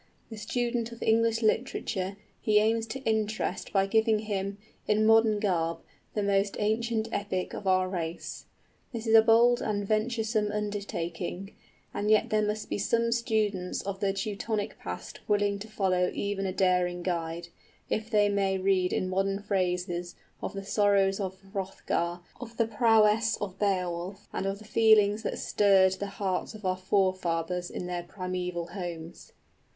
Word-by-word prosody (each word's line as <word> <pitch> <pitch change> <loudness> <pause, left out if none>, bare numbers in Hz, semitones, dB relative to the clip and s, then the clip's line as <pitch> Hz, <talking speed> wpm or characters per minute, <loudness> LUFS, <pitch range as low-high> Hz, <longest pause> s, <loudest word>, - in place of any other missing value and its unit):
The 220 - -7
student 235 +2 -2
of 235 - -7
English 225 +1 +2
literature 200 -4 -1 0.2
he 215 -1 +3
aims 225 +1 +2
to 265 +4 -5
interest 220 -2 -1
by 195 -1 +3
giving 220 +2 +3
him, 200 -2 -3 0.3
in 215 +1 +3
modern 225 -1 +5
garb, 170 -5 0 0.4
the 210 - 0
most 200 0 +1
ancient 220 +1 0
epic 200 -3 -2
of 200 - -6
our 185 0 +3
race. 170 -3 -5 0.5
This 230 -2 -5
is 225 - +1
a 225 - +10
bold 235 +2 +5
and 205 -2 -2
venturesome 220 -1 0
undertaking; 195 -3 -4 0.4
and 205 +1 -1
yet 215 -1 +3
there 215 0 +3
must 210 0 -2
be - - -3
some 230 +3 +1
students 215 -6 0
of 195 0 -4
the 195 -1 +1
Teutonic 205 +1 -3
past - - -7
willing 205 -1 +1
to 210 - -8
follow 185 -4 +1
even 200 -1 -2
a - - -1
daring 180 -2 +1
guide, 170 -1 -3 0.4
if 220 +1 -2
they 210 -2 +4
may 195 -1 +1
read 185 -1 +2
in 185 - 0
modern 195 +2 -1
phrases 180 -3 -1 0.3
of - - -4
the 195 0 -6
sorrows 200 -1 +3
of 190 -1 -3 0.2
Hrothgar, 180 -3 -2 0.2
of 235 -2 -9
the 230 - +3
prowess 225 -1 +3
of 195 -2 -6
Beowulf, 185 -1 -2
and 195 - -2
of 195 +1 -2
the 215 - -14
feelings 215 -1 +4
that - - -3
stirred 195 -2 +4
the 200 - -3
hearts 195 +2 -2
of 210 -2 -10
our 185 0 +1
forefathers 180 -2 0
in - - -5
their 180 -1 -3
primeval 180 -1 -4
homes. 175 -2 -7
200 Hz, 160 wpm, -28 LUFS, 185-220 Hz, 0.5 s, a